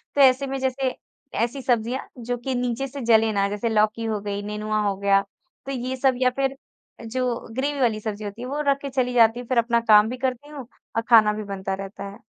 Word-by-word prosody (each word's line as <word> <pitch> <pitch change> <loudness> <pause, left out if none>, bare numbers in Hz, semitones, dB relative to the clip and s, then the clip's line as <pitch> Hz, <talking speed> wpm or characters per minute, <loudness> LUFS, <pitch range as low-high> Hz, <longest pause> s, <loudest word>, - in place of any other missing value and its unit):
तो 285 - +4
ऐसे 265 +1 +5
में 270 0 -3
जैसे, 260 0 -1 0.4
ऐसी 240 +5 -1
सब्जियाँ 245 +1 0 0.2
जो 245 0 -1
कि 255 +2 -3
नीचे 245 +2 -1
से 275 +1 -7
जले 225 -1 +4
ना 200 0 +2
जैसे 210 +3 -2
लौकी 215 +1 +1
हो 215 -2 -1
गई, 205 0 -3
नेनुआ 210 +1 -2
हो 195 - 0
गया, 200 0 +3 0.4
तो 275 - -4
ये 255 0 -3
सब 265 0 +3
या 255 - +5
फिर 270 0 +1 0.5
जो 250 0 -1 0.2
ग्रेवी 280 +2 -1
वाली 220 -3 +2
सब्ज़ी 215 -1 -5
होती 205 +4 -7
है 250 - -5
वो 290 +3 -2
रख 280 0 +4
के 280 - -4
चली 255 -1 0
जाती 230 0 +5
हूँ 245 - -8
फिर 255 - 0
अपना 235 0 +3
काम 210 +1 +7
भी 250 - -5
करती 260 +3 -3
हूँ 275 -5 -8 0.3
और 225 - +2
खाना 215 -2 +7
भी 215 0 -5
बनता 190 0 -3
रहता 195 +1 -6
है। 200 - -12
235 Hz, 235 wpm, -24 LUFS, 215-260 Hz, 0.5 s, काम